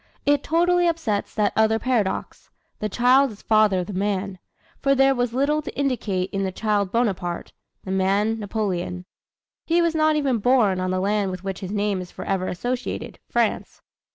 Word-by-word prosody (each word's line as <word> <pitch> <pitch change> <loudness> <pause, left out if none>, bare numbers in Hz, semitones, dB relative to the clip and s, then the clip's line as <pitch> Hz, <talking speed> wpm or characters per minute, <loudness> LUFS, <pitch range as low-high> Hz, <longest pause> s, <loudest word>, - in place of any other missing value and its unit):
It 290 -1 +3
totally 350 +3 +2
upsets 320 -12 -1
that 210 -1 +1
other 220 0 +3
paradox, 225 -5 -2 0.3
"The 215 - -2
child 255 +5 +4
is 210 -3 -13
father 215 -4 +3
of - - -4
the 205 - -7
man," 195 -1 -2 0.4
for 275 0 +3
there 270 0 +4
was 245 -2 -1
little 285 +5 +1
to 300 - -8
indicate 220 -9 -1
in 195 - -2
the 190 -1 -1
child 205 -1 0
Bonaparte, 190 -7 -1 0.3
the 190 - -5
man 200 +4 +1
Napoleon. 190 -4 -3 0.6
He 335 +1 +2
was 335 -1 +2
not 310 -1 +3
even 275 -6 +1
born 215 -5 +3
on 185 0 -1
the 185 0 0
land 200 +1 0
with 185 0 -6
which 195 -2 -4
his 190 - -6
name 205 -2 0
is 180 - -9
forever 190 -1 -3
associated, 245 +7 -4
France. - - -1
215 Hz, 180 wpm, -23 LUFS, 190-260 Hz, 0.6 s, child